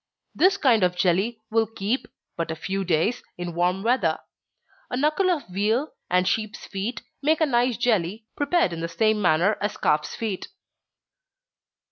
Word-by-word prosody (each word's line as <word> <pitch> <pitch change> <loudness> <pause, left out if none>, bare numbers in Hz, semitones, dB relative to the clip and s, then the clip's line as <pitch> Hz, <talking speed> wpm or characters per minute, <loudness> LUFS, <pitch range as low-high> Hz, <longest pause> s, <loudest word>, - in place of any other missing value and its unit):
This 385 +2 +4
kind 240 -7 +4
of 180 0 +2
jelly 190 +6 +1
will 225 0 +2
keep 225 +3 -2 0.3
but 165 -1 -3
a 160 - -2
few 195 +4 -3
days, 180 +7 +1 0.2
in 175 -1 -5
warm 180 +3 0
weather. 245 +3 +2 0.7
A 250 - -2
knuckle 305 +7 +2
of 335 -5 -1
veal, 215 +10 0 0.2
and 180 +1 +2
sheep's 215 -2 -2
feet, 210 +5 -4 0.2
make 310 +2 +2
a 320 - +4
nice 245 -3 +1
jelly, 215 -3 0
prepared 290 - +1
in 165 - -5
the 165 - -2
same 215 +5 +1
manner 180 +4 +3
as 205 0 -2
calf's 150 0 +1
feet. 215 -5 -3
215 Hz, 160 wpm, -25 LUFS, 180-245 Hz, 0.7 s, This